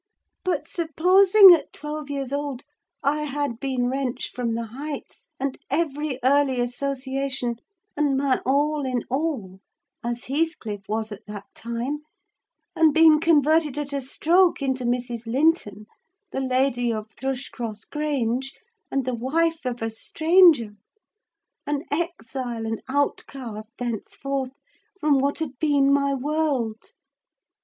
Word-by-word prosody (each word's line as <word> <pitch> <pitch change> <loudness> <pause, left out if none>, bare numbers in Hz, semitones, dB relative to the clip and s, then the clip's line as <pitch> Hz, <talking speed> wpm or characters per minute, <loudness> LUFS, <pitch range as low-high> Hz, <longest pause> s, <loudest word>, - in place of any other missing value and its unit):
But, 370 -1 -1
supposing 370 +4 +6
at 335 - 0
twelve 300 -1 -6
years 275 -2 -3
old 285 -2 -3 0.4
I 300 +2 +1
had 285 -4 -2
been 260 -3 -1
wrenched 255 -1 -2
from 235 -2 -1
the 230 0 -3
Heights, 280 +6 -7
and 275 0 -3
every 295 -2 -1
early 270 -1 +3
association, 265 0 -2 0.4
and 290 -2 +1
my 270 -1 +1
all 290 +2 +1
in 255 -3 -1
all, 260 - -2 0.4
as 240 0 -3
Heathcliff 265 - -2
was 220 0 -2
at 205 0 -10
that 205 -1 -7
time, 235 +5 -4 0.8
and 315 -2 +4
been 320 -1 +7
converted 310 -2 +3
at 290 -1 -3
a 280 - -1
stroke 340 +7 +3
into 265 -3 -1
Mrs. 240 -1 -2
Linton, 235 - +1 0.5
the - - -2
lady 255 -2 +1
of 215 -1 -5
Thrushcross 240 -3 -5
Grange, 270 -4 -2 0.3
and 275 -2 -1
the 255 - -1
wife 320 +7 0
of 240 -2 -3
a 225 - -1
stranger: 315 - +4 1.0
an 290 0 -1
exile, 260 -7 -3
and 225 0 -3
outcast, 260 -5 -2
thenceforth, 255 +3 -3 0.5
from 295 -4 +3
what 280 +2 0
had 285 -6 -5
been 285 -3 +3
my 280 0 +2
world. 270 -6 -2
275 Hz, 130 wpm, -24 LUFS, 245-300 Hz, 1.0 s, been